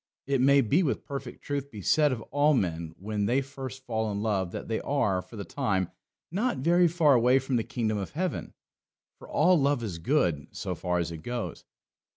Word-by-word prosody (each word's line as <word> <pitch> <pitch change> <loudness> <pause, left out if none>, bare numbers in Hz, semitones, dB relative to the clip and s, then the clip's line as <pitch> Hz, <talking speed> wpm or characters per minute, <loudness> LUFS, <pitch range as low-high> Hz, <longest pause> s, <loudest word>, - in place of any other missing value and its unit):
It 135 -2 +1
may 140 +1 +5
with 145 - +1
perfect 140 -1 -7
truth 140 -1 -3
be 105 -7 -9
said 150 - +4
of 115 -3 -3
all 145 +1 +4
men 85 -6 -2
when 105 +1 -2
they 125 +3 +3
first 135 -1 -7
fall 110 -3 -1
in 100 +1 -3
love 100 -5 0
that - - -6
they 115 - -1
are, 110 -10 +1
for 115 - -14
the 100 -2 -5
time, 95 -5 -1 0.4
not 210 - 0
very 175 +6 +4
far 160 -3 +4
away 125 +1 +5
from 135 0 -1
the 115 - +1
kingdom 110 -3 -1
of 95 - -4
heaven. 180 +4 -3 0.6
For - - -13
all 175 +1 +4
love 140 -3 +2
is 90 -7 -4
good, 85 - +1
so - - -3
far 90 0 -1
as 85 -1 -1
it 85 - -5
goes. 120 +3 -5
125 Hz, 200 wpm, -28 LUFS, 100-140 Hz, 0.6 s, may